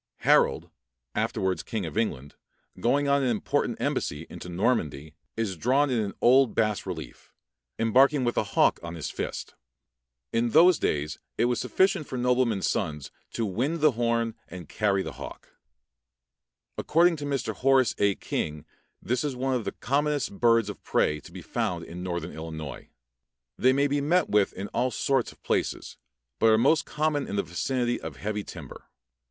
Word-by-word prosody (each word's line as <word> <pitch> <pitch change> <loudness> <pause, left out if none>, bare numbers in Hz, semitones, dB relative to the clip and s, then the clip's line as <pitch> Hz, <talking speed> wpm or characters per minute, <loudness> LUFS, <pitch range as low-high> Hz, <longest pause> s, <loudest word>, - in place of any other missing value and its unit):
Harold, - - +3 0.4
afterwards 95 -3 -1
king 110 -5 -4
of 80 - -6
England, 75 - -2 0.5
going 140 +4 +2
on 140 0 +3
an 130 - +1
important 110 -3 -1
embassy 75 +3 -2
into 90 - -8
Normandy, 85 - -1 0.2
is 110 -4 -1
drawn 130 - +2
in 120 - +1
an 100 -2 -3
old 130 0 +5
bas 105 -3 0
relief, 80 -5 -7 0.5
embarking 130 +5 +4
with 120 -1 0
a - - +2
hawk - - +4
on 85 0 -7
his 80 - -5
fist. - - -5 0.8
In 115 +1 +2
those 175 +1 +7
days 75 +1 -1 0.2
it - - +3
was 120 0 +1
sufficient 190 -5 +1
for 130 - -5
noblemen's 125 -4 +1
sons 75 -8 -2 0.2
to 115 - -1
wind 130 - -1
the 155 0 +5
horn 115 -1 0
and 90 -3 -9
carry 100 +1 0
the - - -5
hawk. - - -9 1.3
According 170 +1 +3
to 145 - -5
Mr. 140 -2 -2
Horace 130 -2 +3
A. 100 -1 +3
King 75 0 -4 0.4
this 125 +1 0
is 145 -3 -2
one 130 +1 -1
of 125 -4 -1
the - - -2
commonest 145 -4 -1
birds 115 -3 +4
of 105 - -7
prey 75 0 +1
to - - -14
be - - -9
found - - -2
in 85 +2 -8
northern 85 -2 -4
Illinois. 80 -3 -7 0.7
They 130 - +4
may 140 +2 +2
be 145 0 0
met 170 +4 +2
with 105 -1 +3
in 100 +2 -5
all 130 - 0
sorts 130 +2 0
of - - -22
places, - - -2 0.4
but 115 - +4
are 110 - +5
most 150 +7 +3
common 150 -2 0
in 100 - -4
the 100 - +1
vicinity 120 +7 -1
of - - -6
heavy 105 0 -3
timber. - - -10
115 Hz, 170 wpm, -27 LUFS, 95-135 Hz, 1.3 s, those